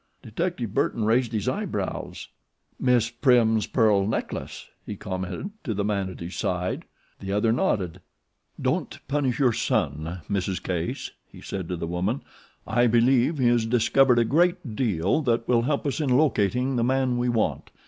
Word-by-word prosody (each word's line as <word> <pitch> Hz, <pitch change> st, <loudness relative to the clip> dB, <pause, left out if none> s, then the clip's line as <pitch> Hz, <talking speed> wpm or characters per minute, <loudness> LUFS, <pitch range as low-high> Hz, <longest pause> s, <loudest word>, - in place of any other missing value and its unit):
Detective 120 Hz, -, -3 dB
Burton 110 Hz, 0 st, 0 dB
raised 115 Hz, +2 st, +2 dB
his 110 Hz, -4 st, -2 dB
eyebrows. -, -, -3 dB, 0.5 s
"Miss 120 Hz, -3 st, +2 dB
Prim's 120 Hz, -3 st, +3 dB
pearl 105 Hz, -5 st, +3 dB
necklace," 110 Hz, -, -4 dB, 0.2 s
he -, -, -6 dB
commented 95 Hz, -, -5 dB
to 115 Hz, -8 st, -2 dB
the 100 Hz, -, -1 dB
man 100 Hz, -2 st, -1 dB
at 90 Hz, -, -10 dB
his 85 Hz, +2 st, -6 dB
side. 90 Hz, 0 st, -2 dB, 0.3 s
The 95 Hz, -, -5 dB
other 105 Hz, +3 st, +2 dB
nodded. 95 Hz, -7 st, 0 dB, 0.6 s
"Don't -, -, -1 dB
punish 140 Hz, -3 st, 0 dB
your 130 Hz, -5 st, +3 dB
son, 80 Hz, 0 st, -1 dB
Mrs. 95 Hz, -2 st, -2 dB
Case," 90 Hz, -2 st, -3 dB, 0.2 s
he -, -, -13 dB
said 95 Hz, -4 st, -5 dB
to 90 Hz, -, -1 dB
the 85 Hz, -, -4 dB
woman. 90 Hz, +9 st, -1 dB, 0.4 s
"I 120 Hz, 0 st, +2 dB
believe 125 Hz, +5 st, +3 dB
he 130 Hz, -3 st, +2 dB
has 120 Hz, -2 st, +2 dB
discovered 125 Hz, +2 st, +4 dB
a 120 Hz, -, +4 dB
great 170 Hz, -, +1 dB
deal 105 Hz, -, +1 dB
that 120 Hz, -4 st, 0 dB
will 120 Hz, -2 st, +3 dB
help 140 Hz, +5 st, -1 dB
us 145 Hz, +2 st, -1 dB
in 145 Hz, -, 0 dB
locating 125 Hz, -2 st, +2 dB
the 115 Hz, -, +2 dB
man 130 Hz, 0 st, +1 dB
we 125 Hz, 0 st, +1 dB
want. 115 Hz, -2 st, -1 dB
115 Hz, 165 wpm, -25 LUFS, 100-130 Hz, 0.6 s, discovered